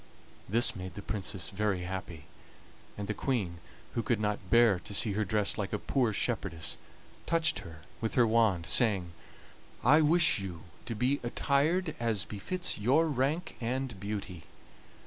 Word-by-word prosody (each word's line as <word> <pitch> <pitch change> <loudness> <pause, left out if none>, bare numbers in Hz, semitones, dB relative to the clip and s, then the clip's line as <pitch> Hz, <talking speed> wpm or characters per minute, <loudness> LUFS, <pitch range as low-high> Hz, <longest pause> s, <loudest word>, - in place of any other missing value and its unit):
This 115 +4 +4
made 95 -1 -7
the 100 - -7
Princess 95 -3 -3
very 100 -2 0
happy, 90 -4 -6 0.7
and 100 -1 -4
the 105 - -1
Queen, 105 -10 -2 0.3
who 115 - 0
could 115 0 0
not 105 -3 -2
bear 115 -5 +5
to 105 - -7
see 105 +1 +2
her 105 +2 0
dressed 105 +1 0
like 100 -1 -3
a - - +1
poor 120 +2 +1
shepherdess, 100 -6 -2 0.5
touched 165 -1 +2
her 80 -3 -11 0.2
with 110 - -2
her 120 - +5
wand, 110 -7 +2
saying: 100 -8 +2 0.7
"I 150 +6 +6
wish 165 - +4
you 90 -5 -6 0.2
to 115 - -3
be 125 +6 +1
attired 150 +7 +1
as 115 -4 0
befits 175 - -2
your 135 +10 +3
rank 145 +5 -1
and 125 -2 -2
beauty." 100 -5 -5
110 Hz, 155 wpm, -31 LUFS, 95-130 Hz, 0.7 s, I